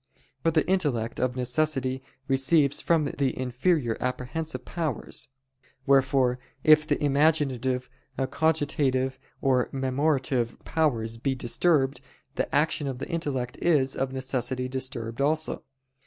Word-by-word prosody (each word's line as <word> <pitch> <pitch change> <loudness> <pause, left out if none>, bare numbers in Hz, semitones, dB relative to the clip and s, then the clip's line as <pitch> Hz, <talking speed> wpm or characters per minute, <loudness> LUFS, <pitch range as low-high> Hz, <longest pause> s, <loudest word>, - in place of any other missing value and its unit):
For 165 - +2
the 155 -1 +1
intellect, 140 -12 0
of 130 0 0
necessity, 130 0 0 0.3
receives 140 +1 +3
from 165 -3 +2
the 135 -2 -1
inferior 130 0 0
apprehensive 125 +2 -3
powers: 160 -9 -4 0.6
wherefore 135 -2 +3 0.2
if 155 0 +6
the - - +1
imaginative, 135 -4 +2 0.3
cogitative, 135 -3 0 0.2
or 130 -2 +2
memorative 135 -2 0
powers 115 -8 0
be 135 +2 0
disturbed, 135 +1 +1 0.3
the - - -2
action 150 0 +1
of 130 -2 -3
the - - -6
intellect 135 -7 -3
is, 140 -6 +2
of 135 0 -1
necessity, 130 -1 -2
disturbed 130 -2 -4
also. 155 +2 0
135 Hz, 115 wpm, -27 LUFS, 125-155 Hz, 0.6 s, if